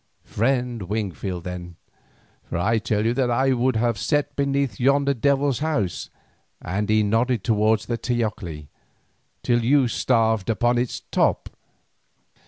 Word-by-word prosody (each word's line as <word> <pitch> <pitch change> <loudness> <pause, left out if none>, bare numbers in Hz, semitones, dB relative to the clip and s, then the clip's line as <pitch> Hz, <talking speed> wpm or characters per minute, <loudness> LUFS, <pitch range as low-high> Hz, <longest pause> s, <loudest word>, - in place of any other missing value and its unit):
"Friend 125 0 -1
Wingfield 95 -2 -4
then. 90 -1 -7 0.7
For - - -4
I 110 +6 +1
tell 105 0 -1
you 115 - +2
that 125 -1 0
I 130 +3 +2
would 125 0 +1
have 115 -2 0
sat 145 +2 0
beneath 140 -5 -1
yonder 140 +2 +3
devil's 140 0 +1
house," 130 - -2 0.5
and 100 +4 -3
he 110 0 +3
nodded 115 +1 +1
towards 110 -1 +2
the 120 -1 -3
teocalli, 105 - -3 0.7
"till 120 -1 +2
you 135 +1 +4
starved 115 -4 +1
upon 120 +2 +2
its 125 0 -3
top. - - +1
115 Hz, 135 wpm, -23 LUFS, 105-130 Hz, 0.7 s, you